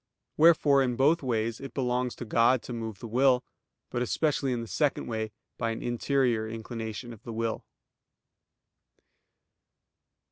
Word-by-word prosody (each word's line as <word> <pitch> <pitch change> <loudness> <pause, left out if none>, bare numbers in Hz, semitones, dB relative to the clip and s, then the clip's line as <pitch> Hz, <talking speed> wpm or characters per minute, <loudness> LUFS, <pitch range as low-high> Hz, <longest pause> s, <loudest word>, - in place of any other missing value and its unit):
Wherefore 150 -3 +5
in 125 -2 +1
both 150 +7 +3
ways 115 -3 -1
it 135 - -8
belongs 125 -1 0
to 120 - -7
God 115 +3 +3
to 125 - -6
move 110 -3 -5
the 115 - -8
will; 125 +2 +3 0.5
but 120 - -1
especially 140 +1 0
in 120 -1 -1
the - - -8
second 145 +4 0
way 110 -1 -3 0.3
by 115 - 0
an 115 - -4
interior 120 -2 +1
inclination 115 +1 -6
of 110 - -14
the 115 - -8
will. 115 0 -2
120 Hz, 145 wpm, -28 LUFS, 115-135 Hz, 0.5 s, Wherefore